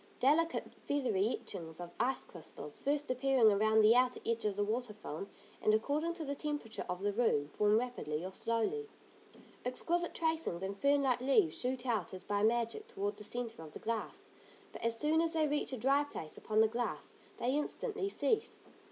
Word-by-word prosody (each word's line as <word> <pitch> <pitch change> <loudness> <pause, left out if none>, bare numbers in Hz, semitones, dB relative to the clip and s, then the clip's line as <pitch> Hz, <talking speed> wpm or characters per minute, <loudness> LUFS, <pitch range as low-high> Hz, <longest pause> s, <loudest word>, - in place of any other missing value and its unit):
Delicate, 315 +6 +2
feathery 235 -9 +1
etchings 165 -8 -4
of 175 -1 -7
ice 250 +3 +1
crystals 155 -3 -10
first 290 0 -1
appearing 255 -3 +4
around 220 +2 +4
the 215 +2 +7
outer 250 0 +3
edge 230 -1 0
of 205 -2 +1
the 205 - +1
water 225 +2 -2
film, 195 -2 -6 0.3
and 215 - +4
according 300 +9 0
to 320 - -5
the 280 - -2
temperature 290 -6 -3
of 180 +2 -3
the 205 0 +1
room, 170 -11 +2
form 210 +6 +3
rapidly 180 -10 -2
or 190 - -5
slowly. 230 - -1 0.7
Exquisite 340 +8 0
tracings, 320 - 0
and 195 +1 -3
fern 280 0 +4
like 250 -2 +2
leaves 300 +8 +3
shoot 255 0 -2
out 225 -6 -1
as 185 - -9
by 205 0 0
magic 235 - +1
toward 410 -3 -3
the - - -9
centre 230 -3 -4
of 155 -2 -10
the - - -6
glass, 230 -1 -3 0.4
but - - -9
as 230 0 +1
soon 310 +5 +3
as 330 0 +2
they 315 -2 +2
reach 290 -1 0
a 260 - -3
dry 275 +5 +3
place 160 - -6
upon 215 0 +1
the 220 - +6
glass, 235 +2 -3 0.2
they 250 +3 0
instantly 395 +7 -2
cease. 440 +2 0
245 Hz, 190 wpm, -34 LUFS, 210-290 Hz, 0.7 s, the